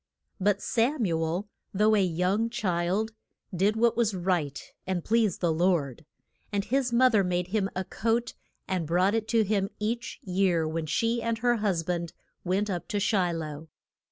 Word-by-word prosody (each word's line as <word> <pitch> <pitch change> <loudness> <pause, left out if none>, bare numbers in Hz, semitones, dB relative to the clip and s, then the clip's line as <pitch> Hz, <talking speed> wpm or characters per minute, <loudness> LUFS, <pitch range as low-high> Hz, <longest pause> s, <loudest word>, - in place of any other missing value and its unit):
But 200 +1 +1
Sam 240 +2 +1
u 165 -3 0
el, 175 +6 -2 0.3
though 215 +2 +4
a 200 - +3
young 185 +6 +1
child, 195 0 -1 0.4
did 200 +4 +2
what 235 +1 +3
was 225 -4 +1
right 175 -6 -1 0.3
and 185 -3 -1
pleased 220 -4 +1
the 170 -3 +2
Lord. 160 -4 0 0.5
And 200 -1 -1
his 260 0 0
moth 250 +1 +4
er 205 -2 +4
made 180 -1 -1
him 195 -1 0
a 185 - -1
coat, 230 +5 -1 0.3
and 180 -4 -1
brought 180 +5 +2
it 225 -1 -1
to 225 -1 +3
him 200 -1 0
each 235 +4 -3
year 180 -3 +1
when 160 0 -3
she 230 +8 0
and 230 0 -1
her 240 +1 +2
hus 195 -6 0
band 170 0 -3 0.3
went 190 +3 0
up 180 -4 -3
to 210 -4 -1
Shi 195 -4 +2
loh. 155 -1 -5
195 Hz, 180 wpm, -28 LUFS, 175-225 Hz, 0.5 s, though